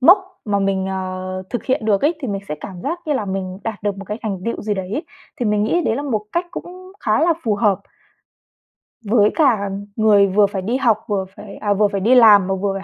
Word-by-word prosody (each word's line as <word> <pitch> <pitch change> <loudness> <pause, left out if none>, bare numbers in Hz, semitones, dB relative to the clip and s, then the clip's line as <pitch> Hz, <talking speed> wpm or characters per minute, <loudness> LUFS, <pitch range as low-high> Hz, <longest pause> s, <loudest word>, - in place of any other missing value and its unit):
mốc 355 +10 +8 0.3
mà 205 -2 0
mình, 195 -1 0
ờ, 185 0 -4
thực 240 - -3
hiện 255 -4 0
được 205 -3 +2
ấy, 310 +4 +3
thì 265 - -4
mình 200 -1 -2
sẽ - - -2
cảm 185 -3 -8
giác 335 +5 -3
như 300 - +1
là 225 -7 -1
mình 190 -1 -4
đạt 220 -2 -4
được 205 -1 -1
một 200 - -7
cái 210 +3 -5
thành 200 -4 -3
tựu 230 - -3
gì 210 -1 -1
đấy. 195 - -4 0.4
Thì 240 - +1
mình 210 0 +2
nghĩ 345 +11 +1
đấy 235 -8 0
là 285 - -3
một 220 -7 -2
cách 345 +1 0
cũng 365 +2 -9
khá 215 +6 +1
là 335 +2 +4
phù 220 -4 +1
hợp 205 -3 +2 1.3
với 210 0 +4
cả 230 -10 +3 0.3
người 210 -2 +5
vừa 200 +2 +4
phải 195 -1 -3
đi 230 +7 -1
học 235 -6 +3
vừa 200 -3 -1
phải 200 -2 -10
à, 205 -1 0
vừa 210 +1 +3
phải 200 -1 -3
đi 235 +6 +4
làm 210 -6 +7
mà 195 - 0
vừa 195 +1 -1
phải 195 - -5
210 Hz, 250 wpm, -20 LUFS, 195-240 Hz, 1.3 s, mốc